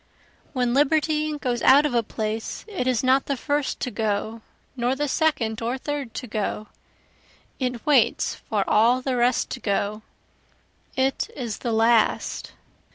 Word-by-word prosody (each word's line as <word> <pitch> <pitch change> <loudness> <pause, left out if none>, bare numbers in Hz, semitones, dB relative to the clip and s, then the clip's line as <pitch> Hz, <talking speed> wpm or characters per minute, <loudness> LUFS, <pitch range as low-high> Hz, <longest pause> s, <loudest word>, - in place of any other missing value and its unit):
When 250 -3 0
liberty 305 +2 +2
goes 245 -4 -2
out 280 +3 +6
of 295 - -1
a 235 - +3
place 220 0 -4
it 370 - -3
is 255 -2 +1
not 260 +1 +3
the 280 - -1
first 290 +1 -1
to 250 - -2
go, 220 +1 -2 0.3
nor 245 +1 0
the 295 +2 -1
second 260 -8 0
or 240 +3 -1
third 280 -3 -5
to 255 - -4
go, 215 -1 -3 0.9
It 250 -3 -3
waits 275 -7 +3
for 205 -3 -3
all 240 +4 +4
the 260 -1 -1
rest 245 +1 +1
to 260 - -4
go, 205 0 -1 0.9
it 265 +1 0
is 235 -6 -4
the 240 - -2
last. 225 0 +2
250 Hz, 155 wpm, -24 LUFS, 225-275 Hz, 0.9 s, out